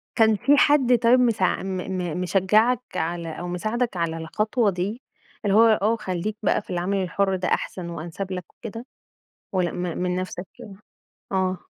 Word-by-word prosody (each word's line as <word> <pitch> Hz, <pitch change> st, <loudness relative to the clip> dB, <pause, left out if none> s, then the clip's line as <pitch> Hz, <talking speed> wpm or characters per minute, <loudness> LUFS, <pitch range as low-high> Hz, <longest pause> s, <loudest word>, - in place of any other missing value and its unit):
كان 220 Hz, -2 st, +5 dB
في 280 Hz, +7 st, +3 dB
حد 270 Hz, -4 st, +5 dB
طيب 240 Hz, +2 st, +6 dB
مساع 220 Hz, -7 st, +2 dB
م 190 Hz, -1 st, -3 dB
م 180 Hz, -2 st, -2 dB
مشجعك 205 Hz, +7 st, +3 dB, 0.2 s
على 170 Hz, -1 st, -2 dB
أو 175 Hz, -, -5 dB
مساعدك 215 Hz, +5 st, -2 dB
على 165 Hz, -1 st, -1 dB
الخطوة 210 Hz, +8 st, 0 dB
دي؟ 195 Hz, +7 st, -3 dB, 0.4 s
اللي 200 Hz, -1 st, +3 dB
هو 225 Hz, -, +7 dB, 0.2 s
آه، 215 Hz, +3 st, +3 dB
خلّيك 210 Hz, 0 st, -3 dB
بقى -, -, +2 dB
في -, -, -27 dB
العمل 180 Hz, +3 st, -1 dB
الحُر 195 Hz, +1 st, 0 dB
ده 185 Hz, -1 st, -2 dB
أحسن، 175 Hz, -2 st, -2 dB
وأنسب 170 Hz, +3 st, -6 dB
لك 180 Hz, -1 st, -4 dB
وكده؟ 230 Hz, +2 st, -8 dB, 0.7 s
والّا 180 Hz, -3 st, 0 dB
م -, -, -7 dB, 0.2 s
من 180 Hz, 0 st, -1 dB
نفسك 185 Hz, 0 st, -4 dB
كده؟ 205 Hz, -, -10 dB, 0.6 s
آه. 185 Hz, -1 st, 0 dB
190 Hz, 170 wpm, -24 LUFS, 180-220 Hz, 0.7 s, هو